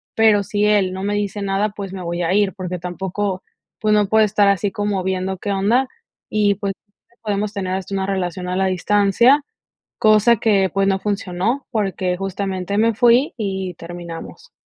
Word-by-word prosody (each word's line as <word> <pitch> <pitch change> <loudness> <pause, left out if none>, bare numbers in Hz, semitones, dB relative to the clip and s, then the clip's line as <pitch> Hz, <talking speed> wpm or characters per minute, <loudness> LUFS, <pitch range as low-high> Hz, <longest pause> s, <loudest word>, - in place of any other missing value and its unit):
pero 215 -2 +4
si 205 +2 0
él 200 -3 +2
no 190 +1 -5
me 205 +1 -1
dice 205 0 -2
nada, 200 +2 0
pues, 200 -2 -7
me 190 -1 -6
voy 170 +1 -3
a 170 - +1
ir, 205 -1 +2
porque 180 -2 -5
tampoco, 190 +2 -3 0.4
pues 215 -1 +2
no 210 -1 +3
puedo 220 +1 +4
estar 205 -1 +2
así 200 0 +1
como 205 -2 -2
viendo 190 0 -2
qué 200 +2 -4
onda, 225 +7 +2 0.4
y 205 -2 +2
pues 200 -1 -3 0.5
podemos 210 -1 -2
tener 185 -2 -3
hasta 190 +1 -4
una 190 -1 -1
relación 180 -2 -2
a 180 - -2
la 190 0 +1
distancia, 205 - +3 0.6
cosa 215 +2 +5
que, 195 -4 +2
pues, 195 0 +2
no 195 -1 +1
funcionó 200 +5 -2
porque 190 -4 -1
justamente 195 0 -3
me 230 0 +3
fui 245 +4 +4
y 190 -3 -3
terminamos. 170 - -9
195 Hz, 180 wpm, -20 LUFS, 185-210 Hz, 0.6 s, cosa